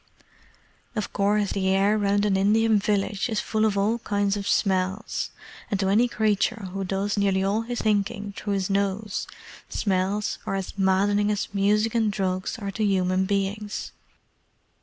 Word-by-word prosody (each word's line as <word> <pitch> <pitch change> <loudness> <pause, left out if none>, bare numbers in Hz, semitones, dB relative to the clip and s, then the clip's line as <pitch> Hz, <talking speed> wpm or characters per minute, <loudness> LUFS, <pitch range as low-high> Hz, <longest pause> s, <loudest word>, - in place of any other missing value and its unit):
Of 210 -3 -3
course 205 0 +1
the 190 -1 -1
air 195 +2 +3
round 205 -1 +2
an 200 -2 +2
Indian 215 +2 +3
village 205 +2 0
is 220 -2 0
full 220 0 0
of 205 -2 +1
all 215 +4 +1
kinds 205 -2 0
of 200 -1 -4
smells, 190 +1 0 0.4
and 200 - -1
to 190 -1 +1
any 225 +5 +4
creature 215 -2 0
who 195 0 -2
does 195 +2 -1
nearly 195 -1 +2
all 200 +3 +1
his 240 +1 -4
thinking 205 -1 0
through 205 - -3
his 195 -2 0
nose, 200 +1 -1 0.4
smells 195 +1 -1
are - - -1
as 195 -1 -4
maddening 200 +2 +2
as 205 -1 -2
music 210 +2 +2
and 225 -3 +2
drugs 185 +2 -2
are 200 -3 -4
to 215 +3 -2
human 190 -2 +2
beings. 200 +1 -2
200 Hz, 160 wpm, -25 LUFS, 195-210 Hz, 0.4 s, any